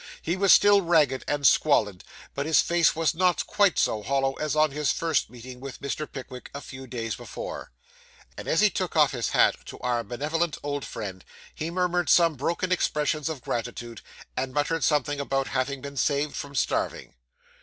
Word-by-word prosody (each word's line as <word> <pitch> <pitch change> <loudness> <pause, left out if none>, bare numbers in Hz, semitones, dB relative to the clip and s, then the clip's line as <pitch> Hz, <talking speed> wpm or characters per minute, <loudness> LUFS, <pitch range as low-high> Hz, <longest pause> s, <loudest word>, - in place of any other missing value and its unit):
He 170 - 0
was 195 0 +3
still 205 -1 +7
ragged 155 -7 +2
and 145 -1 -1
squalid, 105 -11 +3 0.3
but 140 +1 -3
his 160 - +4
face 170 -2 +3
was 160 -2 +1
not 180 +1 +1
quite 205 -3 +2
so 110 - +1
hollow 135 +3 0
as 155 0 -1
on 155 -1 +3
his 150 -1 0
first 165 -2 0
meeting 125 +1 -11
with 135 0 -8
Mr. 145 +2 -4
Pickwick, 130 -2 -9
a - - -4
few 130 -1 -10
days 115 -2 -4
before. - - -7 0.6
As - - 0
he 210 -1 +5
took 185 -3 -3
off 150 -3 +5
his 125 -4 -2
hat - - +3
to - - -8
our 120 -1 0
benevolent 150 +8 -2
old 145 -1 -3
friend, 95 -4 -7 0.3
he 155 - -4
murmured 180 0 0
some 170 -2 +5
broken 170 +6 -2
expressions 150 -3 0
of 155 -5 -5
gratitude, 120 -1 -5 0.3
and 130 0 -3
muttered 155 +2 0
something 145 -1 +1
about 135 -1 -1
having 130 +1 -2
been 140 0 -8
saved 145 +3 0
from 145 0 -6
starving. - - -1
145 Hz, 180 wpm, -26 LUFS, 130-165 Hz, 0.6 s, still